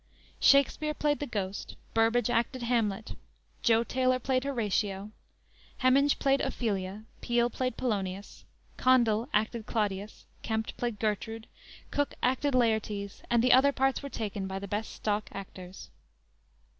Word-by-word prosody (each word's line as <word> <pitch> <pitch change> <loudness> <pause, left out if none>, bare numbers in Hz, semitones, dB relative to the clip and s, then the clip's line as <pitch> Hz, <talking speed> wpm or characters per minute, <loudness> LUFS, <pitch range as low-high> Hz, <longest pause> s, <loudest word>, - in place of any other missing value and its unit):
Shakspere 290 +2 +4
played 295 0 +1
the 290 - -3
Ghost, 200 -4 -4 0.2
Burbage 225 +1 +3
acted 240 +1 0
Hamlet, 225 -4 0 0.5
Jo 230 -1 +4
Taylor 255 +1 +1
played 255 +1 0
Horatio, 210 -5 -1 0.7
Heminge 275 +3 +4
played 275 -1 +2
Ophelia, 200 -2 -2 0.2
Peele 240 0 +1
played 255 +1 -2
Polonius, 200 -5 -3 0.3
Condell 240 -2 +3
acted 220 +1 0
Claudius, 205 -2 -2 0.2
Kempt 220 0 -2
played 240 -3 -3
Gertrude, 220 +1 -2 0.5
Cooke 285 0 -1
acted 260 +2 +1
Laertes, 215 -4 0
and 235 -1 +3
the 250 - +6
other 270 +2 +6
parts 270 -1 +1
were 280 - -6
taken 205 -5 -4
by 190 0 -4
the 200 +1 -6
best 205 +3 -3
stock 210 0 -2
actors. 185 -1 -9
225 Hz, 130 wpm, -29 LUFS, 205-255 Hz, 0.7 s, the